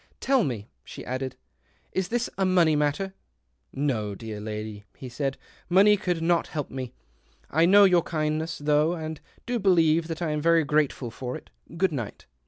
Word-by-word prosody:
" - - -42
Tell 270 -4 +5
me," 115 - -3 0.2
she - - -10
added, 130 0 -3 0.3
" - - -38
is 190 -1 -1
this 240 +3 -1
a 195 - 0
money 175 -4 +4
matter? 150 +6 0 0.4
" 60 -1 -47 0.2
"No, 105 -4 -3
dear 110 0 -7
lady," 105 -1 -6
he 130 - -8
said. 135 +2 -2 0.2
" - - -27
Money 200 +4 +6
could 180 -5 -2
not 170 0 +2
help 150 -3 -4
me. 130 -2 -5 0.6
I 165 +3 +4
know 200 +2 +7
your 180 -3 +5
kindness 155 0 -2
though, 150 +2 +2
and 160 -2 -6 0.2
do 245 0 -1
believe 165 -4 +3
that 165 -1 -5
I 160 - 0
am 150 0 -1
very 165 +1 +4
grateful 145 -4 0
for 125 +2 -5
it. - - -17 0.3
Good 190 0 +2
night." 120 -8 -5
155 Hz, 190 wpm, -26 LUFS, 130-175 Hz, 0.6 s, know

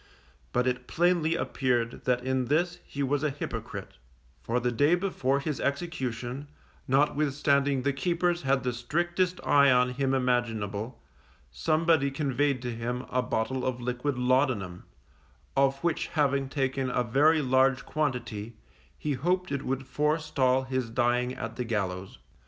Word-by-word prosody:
But 125 +1 +1
it 125 -1 -1
plainly 170 0 +2
appeared 125 -7 -1
that 125 -1 +1
in 130 0 0
this 175 +7 0
he 140 - -3
was 140 +1 0
a 150 - +1
hypocrite; 140 - -6 0.4
for 120 - 0
the 125 0 0
day 145 +8 +4
before 140 -8 0
his 150 0 -3
execution, 140 -3 -3 0.4
notwithstanding 140 -1 +2
the 140 0 +1
keepers 175 +4 0
had 135 -1 +1
the 125 -1 -1
strictest 175 +8 -1
eye 140 -1 +6
on 125 -1 +4
him 135 +1 0
imaginable, 115 -3 -1 0.5
somebody 155 - +2
conveyed 140 -1 0
to 120 -1 -3
him 120 +2 -3
a 125 - +2
bottle 125 +2 -1
of 130 -1 -1
liquid 125 +3 -2
laudanum, 125 -8 +1 0.7
of 135 0 +3
which 170 -2 0
having 140 -3 +1
taken 135 -1 -1
a 125 0 +1
very 150 +6 +3
large 130 0 +3
quantity, 120 -7 -3 0.4
he 150 - -2
hoped 180 +7 0
it 140 -1 -1
would 135 +1 -3
forestall 150 -4 +1
his 130 -2 -2
dying 125 +1 +1
at 115 -2 -6
the 125 - -1
gallows. 95 -5 -3
130 Hz, 145 wpm, -28 LUFS, 125-145 Hz, 0.7 s, eye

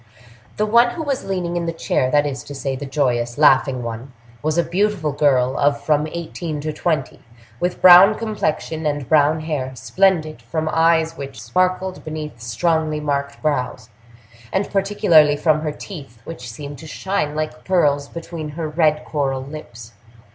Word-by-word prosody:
The 215 - +1
one 235 +3 +5
who 320 - -4
was 280 -3 -2
leaning 180 -3 -2
in 170 -1 -2
the - - 0
chair—that 145 -3 +1
is 135 -3 -4
to 145 - -8
say, 135 -1 -3
the 140 +2 -6
joyous, 120 -4 0
laughing 135 -3 +4
one—was 115 +5 -6
a 170 - +4
beautiful 175 -1 0
girl 135 -3 +2
of 140 0 +2
from 150 +1 +1
eighteen 165 -1 -5
to 155 +1 -3
twenty, 155 -3 -2 0.4
with 180 0 -2
brown 185 +4 +9
complexion 160 -7 -2
and 145 -3 -2
brown 155 0 +3
hair, 140 -5 -3
splendid, 155 - +1
from 155 +7 -3
eyes 165 0 +2
which 135 -4 -7
sparkled 185 - -1
beneath 155 -6 -6
strongly 155 +7 0
marked 140 -1 -3
brows, 125 -6 -2 0.6
and 195 +1 -1
particularly 195 -7 +4
from 155 0 +2
her 155 -1 -2
teeth, 145 - -10
which 125 -7 -8
seemed 140 +5 -8
to 160 - -10
shine 155 -3 -2
like 155 0 -4
pearls 145 -6 +2
between 165 -1 -7
her 155 +2 -4
red 155 -1 +1
coral 135 -3 -2
lips. 120 -6 -10
150 Hz, 160 wpm, -20 LUFS, 135-170 Hz, 0.6 s, brown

